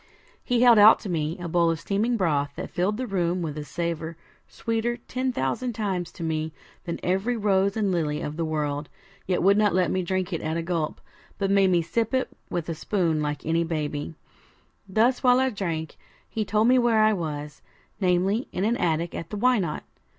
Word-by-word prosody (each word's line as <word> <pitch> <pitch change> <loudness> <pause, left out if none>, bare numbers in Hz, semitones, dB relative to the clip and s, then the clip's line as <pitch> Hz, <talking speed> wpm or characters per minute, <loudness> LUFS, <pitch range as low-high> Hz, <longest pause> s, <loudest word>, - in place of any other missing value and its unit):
He 245 0 +2
held 240 -3 +7
out 215 +2 +9
to 205 - -6
me 160 0 -1
a 175 -1 -5
bowl 170 0 +2
of 165 -1 -1
steaming 215 +7 0
broth, 145 -7 0
that - - -6
filled 195 +4 0
the 255 - -2
room 180 -4 -1
with 150 -3 -4
a 150 - -5
savour 165 +1 -4 0.3
sweeter, 230 +1 -2
ten 255 +2 -3
thousand 235 - -2
times, 190 -5 -2
to 170 - -7
me 160 -1 -2 0.3
than 170 - -4
every 195 +7 0
rose 200 -1 +2
and 205 -3 +1
lily 150 -4 0
of 150 -2 -4
the 165 - -2
world; 150 -2 -2 0.4
yet 180 -2 +1
would 200 +2 +5
not 210 -3 +3
let 185 -2 +2
me 185 - 0
drink 185 +1 -2
it 165 - -2
at 160 +1 -2
a 165 - -2
gulp, 165 -3 -2 0.4
but 195 -1 0
made 195 -1 +4
me 175 -2 +3
sip 225 +9 -1
it 260 - 0 0.2
with 170 -2 -3
a 165 - -2
spoon 165 -2 0
like 150 -1 -3
any 165 +1 +1
baby. 155 -1 -3 0.7
Thus 230 +6 +2
while 250 0 +5
I 260 0 +2
drank, 165 -7 -4 0.3
he 220 -1 -3
told 215 +2 +2
me 255 +1 +5
where 230 -3 +4
I 215 0 +4
was, 150 -4 -5 0.4
namely, 190 +5 +1
in 185 - -1
an 235 +2 +1
attic 165 0 0
at 165 - -6
the 210 - -5
Why 250 +2 +3
Not? 170 -5 -3
180 Hz, 210 wpm, -25 LUFS, 160-215 Hz, 0.7 s, out